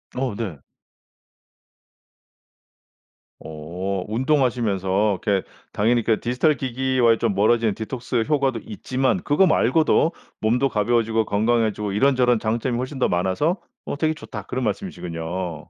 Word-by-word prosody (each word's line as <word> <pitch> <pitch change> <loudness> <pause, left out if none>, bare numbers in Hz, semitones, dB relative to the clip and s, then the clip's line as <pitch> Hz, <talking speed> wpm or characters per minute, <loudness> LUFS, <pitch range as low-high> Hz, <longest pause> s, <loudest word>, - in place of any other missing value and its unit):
어 125 -4 -2
네. 100 -9 -4 2.8
어. 80 +4 -7 0.2
운동하시면서 110 - +1
이렇게 100 -3 +1 0.3
당연히 115 +3 +2
그 110 -1 +1
디지털 130 +6 +1
기기와의 130 -2 +2
좀 110 -4 0
멀어지는 110 +1 +3
디톡스 120 +1 -3
효과도 135 -6 +1
있지만 130 - -1
그거 150 +6 +3
말고도 155 +4 +3 0.3
몸도 125 +5 +2
가벼워지고 115 0 +1
건강해지고 110 -1 0
"이런저런 125 +2 +3
장점이 115 +3 -1
훨씬 130 +2 -4
더 - - +3
많아서 95 - 0 0.3
어 - - -4
되게 155 +1 +1
좋다." 115 -8 -8
그런 125 +6 -4
말씀이시군요. 90 - -4
115 Hz, 305 characters per minute, -22 LUFS, 105-130 Hz, 2.8 s, 멀어지는